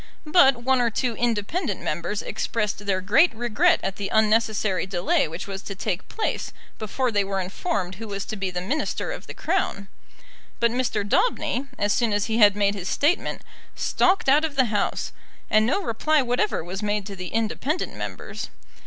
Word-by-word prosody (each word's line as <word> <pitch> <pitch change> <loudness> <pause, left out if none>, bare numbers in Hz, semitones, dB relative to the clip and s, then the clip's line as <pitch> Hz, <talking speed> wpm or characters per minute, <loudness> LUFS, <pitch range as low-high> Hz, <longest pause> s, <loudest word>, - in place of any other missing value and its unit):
But 275 -7 +5
one 260 0 +3
or 235 - +3
two 235 +1 -1
independent 240 - -1
Members - - -3
expressed 210 - -2
their 190 -1 +1
great 270 - +4
regret 235 -2 +3
at 190 0 -3
the 200 -1 -3
unnecessary 215 -3 +2
delay 180 -3 +1
which 165 +3 -6
was 195 -1 -6
to 200 - -7
take 185 -1 -3
place 445 - -2 0.3
before 240 +4 -1
they 205 -2 +2
were 195 0 -2
informed 190 - -2
who 220 +4 -8
was 200 -1 -4
to - - -5
be 195 -2 -2
the 180 -1 -3
Minister 275 +12 -2
of - - -7
the - - -8
Crown. 200 -1 -1 0.7
But 235 -1 +3
Mr. 230 -5 -1
Daubeny, 275 - +1
as 205 0 +1
soon 235 -3 +1
as 205 0 +1
he 225 0 0
had 205 -2 +7
made 200 -1 +2
his 190 -2 -5
statement, 310 +6 0 0.3
stalked 370 -3 +2
out 290 +3 +5
of 310 -3 -2
the 260 -2 +4
House, 205 - -1 0.4
and 215 +1 +4
no 390 +10 +1
reply 300 +4 +2
whatever 245 -7 0
was 185 +4 -5
made 210 -1 -1
to 200 -1 -7
the 185 -1 -6
independent 230 - -1
Members. - - -6
215 Hz, 185 wpm, -24 LUFS, 200-255 Hz, 0.7 s, had